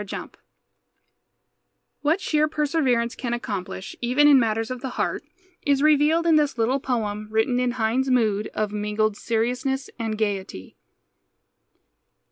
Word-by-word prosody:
HEINELET 195 Hz, -, -7 dB, 1.7 s
What 310 Hz, +5 st, +2 dB
sheer 305 Hz, -5 st, +1 dB
perseverance 280 Hz, -6 st, 0 dB
can 240 Hz, -2 st, -3 dB
accomplish, 190 Hz, -4 st, -5 dB
even 255 Hz, +5 st, +3 dB
in 285 Hz, -2 st, +7 dB
matters 225 Hz, 0 st, 0 dB
of 255 Hz, -1 st, -5 dB
the 265 Hz, -, -4 dB
heart, -, -, -1 dB, 0.4 s
is 280 Hz, -1 st, +1 dB
revealed 305 Hz, +2 st, +4 dB
in 325 Hz, -2 st, +5 dB
this 295 Hz, -4 st, +1 dB
little 240 Hz, +4 st, +1 dB
poem 215 Hz, -5 st, -2 dB
written 220 Hz, +3 st, +1 dB
in 250 Hz, -1 st, 0 dB
Heine's 250 Hz, +3 st, 0 dB
mood 215 Hz, -5 st, +2 dB
of 210 Hz, -1 st, -1 dB
mingled 210 Hz, 0 st, 0 dB
seriousness 250 Hz, +5 st, -2 dB
and 220 Hz, -2 st, -2 dB
gayety. 195 Hz, -, -3 dB
245 Hz, 130 wpm, -24 LUFS, 215-280 Hz, 1.7 s, in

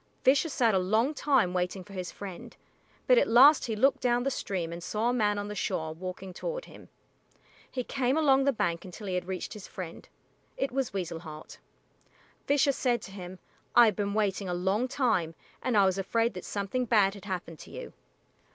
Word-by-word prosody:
Fisher 280 Hz, +5 st, +4 dB
sat 235 Hz, -6 st, +2 dB
a 190 Hz, -, +3 dB
long 220 Hz, +10 st, +1 dB
time 265 Hz, -12 st, +2 dB
waiting 180 Hz, +1 st, -2 dB
for 200 Hz, -, -14 dB
his 185 Hz, -2 st, -5 dB
friend, 195 Hz, -4 st, -9 dB, 0.5 s
but -, -, +6 dB
at -, -, +2 dB
last 270 Hz, +5 st, +7 dB
he 225 Hz, -, -2 dB
looked 270 Hz, +6 st, +3 dB
down 245 Hz, 0 st, +2 dB
the 275 Hz, -, 0 dB
stream 180 Hz, -9 st, -3 dB
and 170 Hz, -, -7 dB
saw 215 Hz, +6 st, -1 dB
a -, -, +1 dB
man 210 Hz, -4 st, +1 dB
on 205 Hz, 0 st, -3 dB
the 210 Hz, -, -5 dB
shore 160 Hz, -5 st, -2 dB
walking 185 Hz, +2 st, -7 dB
toward -, -, -4 dB
him. -, -, -14 dB, 0.8 s
He 255 Hz, -, -3 dB
came 265 Hz, +2 st, 0 dB
along 275 Hz, -4 st, +4 dB
the 280 Hz, -, +4 dB
bank 170 Hz, -9 st, -1 dB
until 185 Hz, +3 st, -9 dB
he 190 Hz, -, -3 dB
had 180 Hz, -1 st, -2 dB
reached 185 Hz, -2 st, -4 dB
his 210 Hz, -3 st, -9 dB
friend. 180 Hz, -3 st, -8 dB, 0.5 s
It 270 Hz, -, -1 dB
was 265 Hz, -1 st, -1 dB
Weasel 175 Hz, -4 st, -4 dB
Heart. 155 Hz, -2 st, -10 dB, 0.9 s
Fisher 285 Hz, 0 st, +4 dB
said 245 Hz, -4 st, 0 dB
to -, -, -9 dB
him, 185 Hz, -1 st, -8 dB, 0.4 s
"I 240 Hz, -, +9 dB
have 215 Hz, -3 st, +2 dB
been 200 Hz, +1 st, -2 dB
waiting 200 Hz, -2 st, 0 dB
a 175 Hz, -, -1 dB
long 195 Hz, +7 st, 0 dB
time, 225 Hz, -, 0 dB, 0.3 s
and 245 Hz, -4 st, +1 dB
I 200 Hz, -, +6 dB
was 190 Hz, 0 st, +1 dB
afraid 230 Hz, +4 st, +1 dB
that -, -, -7 dB
something 205 Hz, +5 st, -2 dB
bad 210 Hz, -4 st, +3 dB
had 200 Hz, -2 st, -11 dB
happened 175 Hz, -5 st, -5 dB
to -, -, -11 dB
you." -, -, -8 dB
205 Hz, 205 wpm, -29 LUFS, 185-250 Hz, 0.9 s, I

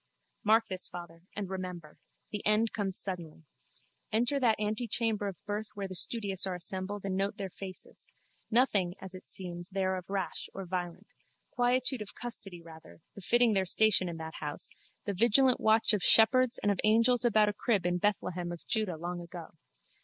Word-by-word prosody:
Mark 225 Hz, +1 st, +4 dB
this 185 Hz, -1 st, -1 dB
farther 170 Hz, -1 st, -10 dB
and 205 Hz, -2 st, -3 dB
remember. 180 Hz, -4 st, -7 dB, 0.3 s
The 210 Hz, -, -4 dB
end 215 Hz, +2 st, +2 dB
comes 195 Hz, -3 st, -1 dB
suddenly. 170 Hz, -5 st, -4 dB, 0.7 s
Enter 240 Hz, +6 st, +2 dB
that 230 Hz, -5 st, +2 dB
antechamber 215 Hz, 0 st, 0 dB
of 190 Hz, -3 st, -5 dB
birth 210 Hz, +1 st, -3 dB
where 200 Hz, -1 st, -4 dB
the 190 Hz, -, -8 dB
studious 195 Hz, 0 st, +2 dB
are 185 Hz, -, -2 dB
assembled 190 Hz, +3 st, -4 dB
and 190 Hz, -1 st, -2 dB
note 195 Hz, +1 st, -1 dB
their 195 Hz, -2 st, -5 dB
faces. 185 Hz, 0 st, -9 dB, 0.4 s
Nothing, 205 Hz, -7 st, +2 dB
as 190 Hz, -1 st, -8 dB
it 185 Hz, -, -11 dB
seems, 175 Hz, -2 st, -3 dB
there 190 Hz, -1 st, -1 dB
of 185 Hz, -1 st, -8 dB
rash 195 Hz, -2 st, -3 dB
or 195 Hz, -, -5 dB
violent. 180 Hz, +1 st, -4 dB, 0.5 s
Quietude 250 Hz, 0 st, +1 dB
of 210 Hz, -, -7 dB
custody, 195 Hz, -7 st, -3 dB
rather, 160 Hz, 0 st, -14 dB
befitting 230 Hz, +4 st, +2 dB
their 195 Hz, -1 st, +2 dB
station 200 Hz, -2 st, +4 dB
in 170 Hz, -, -6 dB
that 160 Hz, 0 st, -7 dB
house, 150 Hz, -1 st, -5 dB, 0.3 s
the 200 Hz, -, -2 dB
vigilant 240 Hz, +6 st, +4 dB
watch 220 Hz, 0 st, +4 dB
of 210 Hz, -, +1 dB
shepherds 235 Hz, +5 st, +5 dB
and 205 Hz, -, +3 dB
of 200 Hz, -, -2 dB
angels 230 Hz, +3 st, +4 dB
about 215 Hz, -3 st, +4 dB
a -, -, -2 dB
crib 205 Hz, -3 st, 0 dB
in 175 Hz, 0 st, 0 dB
Bethlehem 180 Hz, -3 st, -1 dB
of 175 Hz, -, -9 dB
Juda 215 Hz, -7 st, -1 dB
long 175 Hz, +2 st, -5 dB
ago. 170 Hz, -1 st, -9 dB
195 Hz, 175 wpm, -30 LUFS, 180-220 Hz, 0.7 s, shepherds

